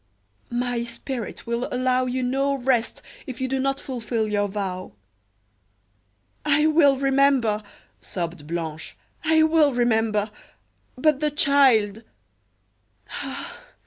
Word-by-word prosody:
"My 240 0 -1
spirit 240 0 -6
will 235 +1 -2
allow 255 0 +1
you 255 +1 -1
no 275 +2 +1
rest 245 -3 0 0.2
if 255 -3 -7
you 260 - -1
do 265 +1 -1
not 275 +1 0
fulfil 230 -3 -2
your 205 -1 0
vow." 190 -2 -4 1.5
"I 300 +1 +3
will 300 -3 +5
remember," 270 -5 +3 0.4
sobbed 170 -4 -5
Blanche; 160 -2 -5 0.3
"I 315 0 +4
will 315 -4 +4
remember. 220 -3 +1 0.7
But 300 +1 +3
the 300 0 +1
child 260 -8 +3 0.6
" 100 0 -40
"Ah! - - -6
245 Hz, 115 wpm, -24 LUFS, 210-275 Hz, 1.5 s, will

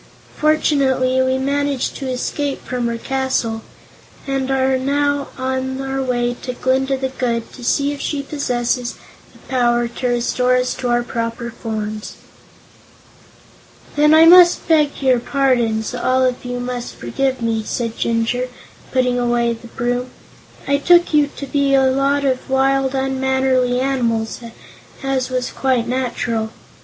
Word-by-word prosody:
"Fortunately, 270 -4 +2
we 260 0 +1
managed 280 0 -1
to 270 -2 -4
escape 275 +2 -3
from 245 -1 -2
her 235 0 -2
castle, 260 -3 -1 0.6
and 270 -1 -2
we 270 - +2
are 265 0 +2
now 285 +1 0
on 260 0 -2
our 270 0 -2
way 245 -2 0
to 250 - -4
Glinda 265 +2 0
the 265 0 -2
Good 235 -3 -3
to 250 - -11
see 280 +4 +1
if 285 - -8
she 285 -2 -2
possesses 250 -4 -2 0.4
the - - -19
power 240 -2 +2
to 240 +2 -4
restore 250 +1 +1
us 250 0 +1
to 250 - -4
our 240 0 +2
former 230 -2 -4
shapes." 215 -1 -8 1.8
"Then 300 +1 +5
I 320 +1 +8
must 350 +1 +7
beg 300 -4 +2
your 255 -2 +4
pardons; 240 -4 0
all 255 +1 +1
of 250 -1 -1
you 245 0 -3
must 245 -1 -5
forgive 260 - -2
me," 225 -1 0
said 230 +1 -3
Jinjur, 230 +2 0 0.4
putting 250 -1 +1
away 240 -1 +1
the 230 +1 -11
broom. 245 +2 -2 0.6
"I 280 0 +3
took 345 +3 +4
you 295 -1 +4
to 280 - -5
be 280 0 +1
a 270 - +4
lot 280 +1 +1
of 260 -1 -1
wild, 270 0 +2
unmannerly 265 -1 +1
animals, 235 -4 -1 0.6
as 265 -1 -1
was 255 -1 -2
quite 255 -3 0
natural. 245 -3 -2
260 Hz, 150 wpm, -19 LUFS, 240-270 Hz, 1.8 s, I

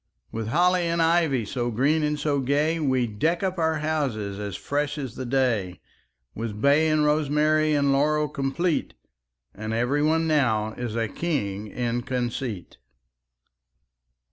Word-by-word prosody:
With 110 -1 -4
holly 175 +6 +2
and 170 0 0
ivy 165 -7 +2
So 120 +3 -2
green 140 +7 +2
and 150 0 -1
so 145 -1 0
gay, 145 +5 +1
We 130 -5 +1
deck 155 - -1
up 185 -1 -1
our 160 -1 +2
houses 135 -11 -2
As 100 -3 -4
fresh 145 +1 -2
as 135 -5 -5
the 130 0 -6
day; 115 - 0 0.5
With 110 -2 -5
bay 145 +6 +4
and 155 -1 +2
rosemary 150 +1 +2
And 140 -1 +2
laurel 150 +2 +2
complete; 150 +4 -1 0.6
And 110 +2 -4
every 125 +5 +1
one 160 +2 +2
now 115 -9 +1
Is 120 -2 -5
a 115 -1 0
king 105 - -3
in 120 +2 -2
conceit. 120 -5 -4
140 Hz, 145 wpm, -25 LUFS, 115-155 Hz, 0.6 s, bay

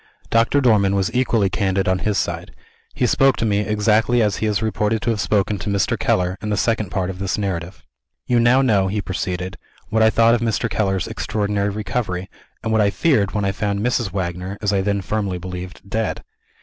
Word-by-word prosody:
Doctor 115 +5 +3
Dormann 105 -6 +3
was 100 +3 0
equally 120 -5 +2
candid 95 0 0
on 95 0 +2
his 105 +2 -1
side. - - -3 0.4
He 125 - +1
spoke 135 +2 +3
to - - -1
me, 100 -2 +2
exactly 110 +3 +2
as 105 -3 +1
he 110 - -1
is 105 +1 0
reported 110 0 0
to 120 - +1
have 105 -3 -1
spoken 105 -1 0
to 105 - -4
Mr. 100 -1 +1
Keller, 90 +1 0
in 105 - -4
the 105 - 0
Second 110 -3 0
Part 95 -1 -2
of 90 - -10
this 95 -1 -1
narrative. 95 -3 -4 0.4
"You 120 -1 +2
now 125 +3 +4
know," 100 -7 +3
he 105 +2 -1
proceeded, 90 -2 -4 0.3
"what 110 +1 +1
I 110 - +6
thought 115 +1 +4
of 120 - +1
Mr. 115 0 0
Keller's 95 -4 0
extraordinary 100 -1 -1
recovery, 105 -3 -3 0.3
and 110 - -2
what 110 -1 +3
I 100 - +3
feared 105 - +1
when 105 -1 0
I 95 - +1
found 100 0 -2
Mrs. 120 -3 0
Wagner 90 +1 -4
(as 105 -1 0
I 100 - +2
then 100 0 0
firmly 100 -2 -2
believed) 90 +1 -8
dead. 110 +1 -2
105 Hz, 210 wpm, -21 LUFS, 95-110 Hz, 0.4 s, I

